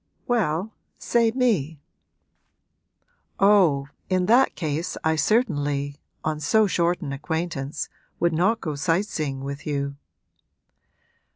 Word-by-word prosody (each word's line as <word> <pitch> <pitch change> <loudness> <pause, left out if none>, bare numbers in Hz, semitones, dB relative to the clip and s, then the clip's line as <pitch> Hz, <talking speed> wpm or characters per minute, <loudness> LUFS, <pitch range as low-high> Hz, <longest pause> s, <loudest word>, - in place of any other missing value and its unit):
'Well, 205 -3 0 0.2
say 235 -1 +2
me.' 210 - 0 1.6
'Oh, 180 -9 +4 0.2
in 185 -1 +2
that 245 +6 +4
case 160 +1 -3
I 160 0 +2
certainly 145 - 0 0.2
on 155 -1 -1
so 215 +8 +3
short 175 -2 +1
an 140 -5 -4
acquaintance 150 -1 -3 0.3
would 170 -1 +2
not 185 +8 +2
go 155 - -3
sight 165 +6 +1
seeing 145 -9 -3
with 140 +1 -6
you.' 140 -1 -2
160 Hz, 110 wpm, -24 LUFS, 145-200 Hz, 1.6 s, Oh